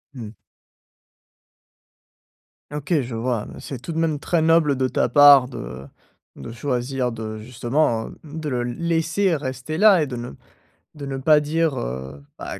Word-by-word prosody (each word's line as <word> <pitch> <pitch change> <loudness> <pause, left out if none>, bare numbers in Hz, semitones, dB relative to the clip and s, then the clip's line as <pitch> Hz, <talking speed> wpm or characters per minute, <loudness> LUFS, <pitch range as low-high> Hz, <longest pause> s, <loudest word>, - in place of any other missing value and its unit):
Mmh. 115 -5 -7 2.4
OK 145 +2 -3
je 120 -2 -6
vois, 115 -1 -2
c'est 135 - -7
tout 170 - -6
de - - -5
même 160 -3 0
très 165 +2 0
noble 160 -3 +3
de 130 0 0
ta - - 0
part 145 -3 +7
de 65 - -8 0.5
de - - -9
choisir 125 +1 -2
de 110 -1 -6
justement 120 +1 -1
de 155 0 -7
le 125 -4 -1
laisser 165 +8 0
rester 135 +2 -5
là 200 -6 +6
et - - -1
de 130 - -6
ne 120 +1 -6 0.6
de 145 -2 -8
ne 135 - -4
pas 150 +3 +4
dire, 155 0 0
heu, 65 +3 -6 0.2
bah - - -7
135 Hz, 155 wpm, -22 LUFS, 120-155 Hz, 2.4 s, part